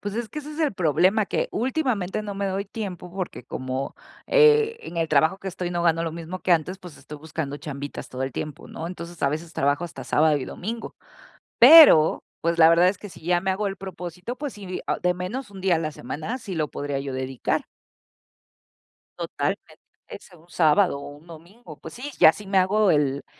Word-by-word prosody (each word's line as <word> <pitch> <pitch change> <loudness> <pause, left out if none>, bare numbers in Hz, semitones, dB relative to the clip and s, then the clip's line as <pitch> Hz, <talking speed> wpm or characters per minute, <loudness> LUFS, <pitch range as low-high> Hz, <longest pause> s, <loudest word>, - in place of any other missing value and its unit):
Pues, 205 0 -5
es 230 -1 -3
que - - -7
ese 300 +1 -8
es 315 - -6
el 300 -6 +1
problema, 185 +6 +2
que - - -1
últimamente 230 - -1
no 205 -1 -6
me 200 0 -2
doy 195 +1 -2
tiempo, 190 -4 -7
porque, 185 -9 -5
como, 130 +2 -4 0.3
eh, 455 -1 +5
en 170 - -9
el 165 -1 0
trabajo 160 +5 +3
que 195 - -6
estoy, 180 -1 -4
no 175 -1 -1
gano 165 -1 +2
lo 160 - -3
mismo 170 +2 -6
que 180 - +1
antes, 175 +4 0
pues, 180 -5 -12
estoy 150 -1 -11
buscando 150 -2 -5
chambitas 145 -2 -7
todo 130 +1 -5
el 135 - -2
tiempo, 150 +2 -6
¿no? 165 - -6
Entonces, 175 -1 -8
a - - +4
veces 160 +3 -5
trabajo 145 +3 0
hasta 170 - -8
sábado, 155 0 +3
y 130 - -5
domingo. 225 - -6 0.6
Pero, 250 - +8 0.2
pues, 170 +1 0
la 160 0 +8
verdad 170 +2 +5
es 190 - -2
que 205 - -9
si 175 - -14
ya 175 0 +2
me 190 - -1
hago 200 +2 -1
el 195 - -3
propósito, 185 +4 -7
pues 290 -3 -5
sí, 190 -3 -7
ah, - - -1
de 180 0 +3
menos 200 +7 -5
1 195 -1 -10
día 185 -2 +2
a - - -1
la 155 -1 -2
semana, 155 - -5
sí 200 -7 -7
lo 155 -2 -1
podría 145 -1 -4
yo 135 -1 -5
dedicar. 130 -1 -2 1.5
Totalmente, - - -4 0.3
ese, 175 - -12
un 165 +2 -22
sábado, 160 -1 +3
o 140 - -8
un 155 - -19
domingo. 170 +2 -13
Pues 160 - -11
sí, 260 +4 -6
ya 160 - +9
si 205 +2 -11
me 195 -1 +2
hago 200 +1 +3
el 140 -2 0
175 Hz, 215 wpm, -24 LUFS, 155-200 Hz, 1.5 s, ya